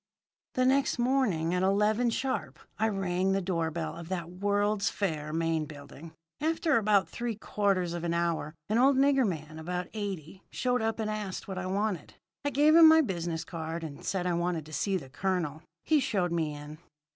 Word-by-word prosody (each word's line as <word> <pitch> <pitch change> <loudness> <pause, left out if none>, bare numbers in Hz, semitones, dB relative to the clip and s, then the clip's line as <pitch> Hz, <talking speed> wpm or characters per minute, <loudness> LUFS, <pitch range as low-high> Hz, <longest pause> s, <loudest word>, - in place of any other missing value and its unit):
"The 255 - +3
next 270 +1 +3
morning 240 -10 +1
at 180 - +1
eleven, 210 +5 +2
sharp, 260 +3 -2 0.2
I 220 - +3
rang 190 -1 0
the 195 - +2
door 170 -3 -1
bell 160 0 -4
of 170 0 -9
that 175 -2 -3
World's 205 +2 +1
Fair 155 -6 -2
main 165 -1 0
building. 145 +2 -11 0.3
After 315 -1 +2
about 205 -2 +3
three 235 -2 -4
quarters 195 -4 0
of 170 -1 -4
an 170 0 0
hour 165 -3 -1
an 220 +3 +2
old 265 +1 +5
nigger 270 -2 +4
man 155 -3 -5
about 180 +2 -4
eighty 195 -5 -5
showed 250 -1 0
up 225 0 0
and 220 - -1
asked 210 -3 -4
what 190 -1 -4
I 185 - -3
wanted. 195 -3 -2 0.3
I 285 - +1
gave 295 +3 +4
him 330 -1 +10
my 320 0 +7
business 170 - -3
card, 165 0 -5
and 145 -3 -7
said 185 -2 -1
I 180 - +1
wanted 170 -2 -1
to 155 - -12
see 195 +4 0
the 145 -7 -8
colonel. 160 +1 -2 0.2
He 310 -1 +3
showed 205 -10 0
me 160 -3 -1
in. 150 +1 -9
185 Hz, 190 wpm, -29 LUFS, 165-220 Hz, 0.3 s, him